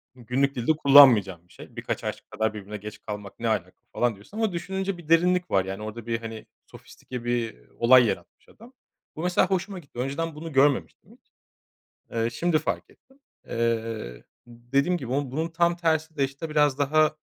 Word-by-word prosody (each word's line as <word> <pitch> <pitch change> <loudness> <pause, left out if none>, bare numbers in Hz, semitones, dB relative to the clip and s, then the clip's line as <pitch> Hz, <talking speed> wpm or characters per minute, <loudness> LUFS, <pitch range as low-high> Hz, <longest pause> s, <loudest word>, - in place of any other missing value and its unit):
günlük 130 +3 -1
dilde 120 +5 +1
kullanmayacağım 120 - +6
bir - - -22
şey. - - -13
Birkaç - - -4
aşk - - -6
kadar 110 0 -1
birbirine 105 0 -7
geç 105 +1 -9
kalmak 105 -2 -8
ne 115 - -2
alaka 95 -5 -1 0.2
falan 120 -2 +1
diyorsun 105 - -13
ama 220 -2 +1
düşününce 190 +2 -3
bir 165 -3 -14
derinlik 180 +2 +3
var. 95 -1 +2
Yani, 95 +2 -5
orada 110 +1 -7
bir, 115 -1 -1
hani, 115 -1 -8 0.2
sofistike 125 -2 -10
bir 115 - -2
olay 125 +1 +6
yaratmış 95 -5 -5
adam. 235 +4 -17 0.4
Bu 160 - -5
mesela 180 0 +2
hoşuma 190 0 -2
gitti. 140 -7 -12
Önceden 150 +5 -2
bunu 160 +1 -7
görmemiştim 135 - +1
hiç. - - -24 0.8
Eee, 115 0 0
şimdi 165 +7 +1
fark 155 - -3
ettim. 270 +1 -26 0.3
Eee, 115 - -2 0.2
dediğim 130 +8 0
gibi 125 -5 -5
ama 140 -2 -1
bunun 160 +5 -2
tam 170 +1 +1
tersi 160 -2 0
de, 140 - +2
işte, 135 +4 -5
biraz 150 -2 +2
daha 155 +2 +3
135 Hz, 180 wpm, -26 LUFS, 115-160 Hz, 0.8 s, kullanmayacağım